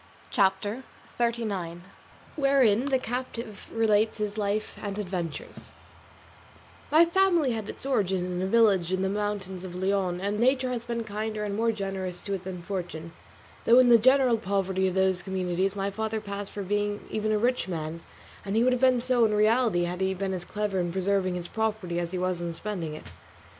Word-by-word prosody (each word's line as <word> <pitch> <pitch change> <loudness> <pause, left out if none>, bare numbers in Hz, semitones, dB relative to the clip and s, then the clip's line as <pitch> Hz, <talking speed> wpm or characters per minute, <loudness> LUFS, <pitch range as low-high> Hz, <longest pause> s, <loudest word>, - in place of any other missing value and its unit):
CHAPTER 205 +2 +1 0.4
XXXIX. 205 -8 -1 0.5
WHEREIN 270 -5 +3
THE 270 -2 +2
CAPTIVE 240 -3 -5
RELATES 220 -1 +2
HIS 210 -1 -2
LIFE 210 0 -2
AND 200 -1 -4
ADVENTURES 180 -6 -5 1.2
My 320 +3 +6
family 340 -5 +3
had 220 -2 -4
its - - -7
origin 190 -9 +1
in 180 0 -3
a 190 - 0
village 195 -5 +3
in 185 0 0
the 190 - +1
mountains 200 -2 -3
of 180 -1 -7
Leon, 190 -1 0
and 200 +2 -2
nature 255 +1 +2
had 240 -1 -4
been 235 -1 -2
kinder 215 0 -3
and 205 -1 -2
more 230 +2 +2
generous 195 -4 -4
to 200 - -4
it 190 -2 -4
than 180 -2 -6
fortune; 170 -4 -5 0.5
though 235 - +6
in 255 -1 +7
the 235 -1 +8
general 260 -1 +4
poverty 190 -1 0
of 185 - -2
those 190 -1 +2
communities 190 +1 -1
my 200 0 -1
father 220 +2 -2
passed 200 -1 -6
for 205 - -5
being 205 +1 -1
even 215 0 -1
a 215 - +3
rich 245 +2 +1
man; 165 -2 -4 0.4
and 200 +1 -3
he 225 - +4
would 255 +1 +4
have 250 - -1
been 255 -2 +4
so 250 -1 +2
in 215 -1 +3
reality 215 -3 +3
had 180 +2 -3
he 190 0 +1
been 190 0 -2
as 180 -1 -5
clever 205 -2 -2
in 175 -1 -1
preserving 190 0 0
his 175 -1 -5
property 215 -6 -2
as 170 -1 -2
he 185 - -3
was 180 -1 -1
in 170 -1 -3
spending 170 -4 -4
it. - - -10
205 Hz, 190 wpm, -27 LUFS, 185-225 Hz, 1.2 s, the